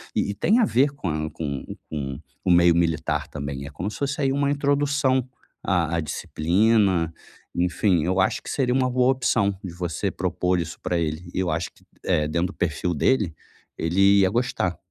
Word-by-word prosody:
e - - +1
e 100 - -3
tem 220 - +3
a - - +5
ver 140 - +3
com 140 -11 -4
a 80 0 -2
com 70 -4 -4 0.2
com 70 -4 -4 0.3
o 90 - +3
meio 85 -1 +6
militar 80 -2 0
também, 70 -2 -5
é 70 - -8
como 85 +8 -4
se - - -8
fosse 140 +1 -2
aí 135 -1 +2
uma 140 +1 +1
introdução 140 -2 +1 0.4
a 85 -3 +1
a 85 - +1
disciplina. 90 +3 +1 0.5
Enfim, 90 0 +2
eu 95 +3 0
acho 95 - +1
que - - -8
seria 125 -3 +1
uma 130 -1 +2
boa 125 +1 +3
opção 100 -6 +1
de 90 -3 -6
você 85 -2 -2
propor 90 0 0
isso 85 -1 -5
pra 85 -1 0
ele, 80 +2 -3
e - - -2
eu 95 -2 0
acho 80 +2 -2
que, - - -25 0.2
eh, 75 -1 +1
dentro 85 +3 0
do 95 - -9
perfil 85 0 -1
dele, 95 - +1 0.4
ele 100 +4 +4
ia 95 -1 +4
gostar. 100 -5 -1
90 Hz, 195 wpm, -24 LUFS, 80-125 Hz, 0.5 s, meio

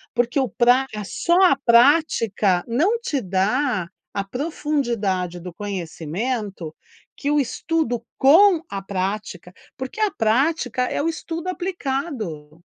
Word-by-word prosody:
porque 240 +3 +1
o 260 - 0
praga, 245 -3 +2
só 345 - +1
a 315 -7 +5
prática 235 - +4
não 335 - +2
te 285 - -2
dá 195 +2 0 0.3
a 200 - 0
profundidade 235 - -2
do 180 -1 -8
conhecimento 195 - -4 0.4
que 285 - -2
o 295 - +2
estudo 275 -2 -1 0.2
com 335 +5 +6
a 195 -1 -4
prática, 190 -1 -4 0.3
porque 260 +11 -6
a 425 - +3
prática 250 +2 +1
é 250 - -1
o 330 - 0
estudo 330 +2 -5
aplicado. 265 - -4
240 Hz, 120 wpm, -22 LUFS, 195-295 Hz, 0.4 s, com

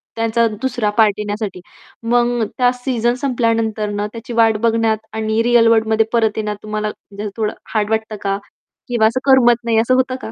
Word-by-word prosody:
त्यांचा 230 +1 +1
दुसरा 245 -5 -1
पार्ट 215 -3 +5
येण्यासाठी. 205 -3 -4 0.5
मग 240 -1 +2
त्या 250 -1 +3
सीझन 245 -2 -1
संपल्यानंतर 230 -5 0
ना 205 0 -2
त्याची 230 +1 -8
वाट 225 -1 +3
बघण्यात 225 -1 +2 0.2
आणि 220 0 0
रिअल 240 -1 +4
वर्ल्डमध्ये 220 -1 +3
परत 220 -2 +1
येण्यात 210 -1 -2
तुम्हाला 215 0 -3
म्हणजे 205 0 -10
असं 205 - -4
थोडं 215 -1 -1 0.2
हार्ड 210 -1 0
वाटतं 220 -1 -2
का? 195 0 -1 0.5
किंवा 235 -3 +3
असं 240 +3 -1
करमत 240 -2 +4
नाही 230 -1 +1
असं 235 +3 +2
होतं 255 0 +1
का? 220 - -7
225 Hz, 180 wpm, -18 LUFS, 215-240 Hz, 0.5 s, पार्ट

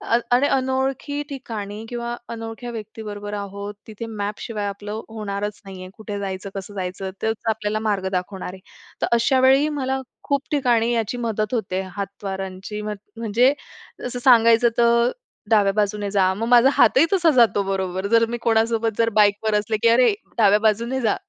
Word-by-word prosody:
अन - - +4
आणि 255 +4 +4
अनोळखी 265 +2 -1
ठिकाणी 220 -6 -6
किंवा 240 0 -4 0.2
अनोळख्या 225 +1 -6
व्यक्तीबरोबर 210 -2 -7
आहोत, 200 0 -6
तिथे 220 +1 -7
मॅप 205 -2 -4
शिवाय 210 -3 -3
आपलं 205 +2 -5
होणारच 205 -1 -4
नाही 190 -1 -9
आहे. 185 - -8
कुठे 210 -2 -5
जायचं, 195 0 -4
कसं 195 +1 -6
जायचं 190 0 -4
तेच 220 0 +1
आपल्याला, 215 -1 -1
मार्ग 195 -2 0
दाखवणार 185 0 -4
आहे. 190 - -12 0.4
तर - - +1
अशा 260 +3 +3
वेळी 275 +3 +4
मला 265 0 -1 0.2
खूप 280 -1 0
ठिकाणी 240 -5 +2
याची 230 +1 -1
मदत 220 -2 -2
होते, 190 -4 -2
हात 200 0 -6
वारांची 195 +2 -5
म्ह 210 0 -3 0.2
म्हणजे 230 +4 +3 0.5
जसं 245 0 -4
सांगायचं 235 -1 +6
तर 235 0 +4 0.4
डाव्या 205 -3 +4
बाजूने 205 -1 0
जा, 190 -2 +3
मग 225 +4 -3
माझा 245 +2 +6
हातही 265 +4 +5
तसा 350 -4 +4
जातो 230 -4 +5
बरोबर 190 0 -2
जर 230 +2 +4
मी 240 - -2
कोणासोबत 225 0 +2
जर 230 0 +3
बाईकवर 210 +1 +3
असले 215 +1 -2
की 230 - +6
"अरे, 250 - +5 0.2
डाव्या 210 -1 +5
बाजूने 230 +4 +1
जा," 220 -3 +2
220 Hz, 170 wpm, -22 LUFS, 200-235 Hz, 0.5 s, सांगायचं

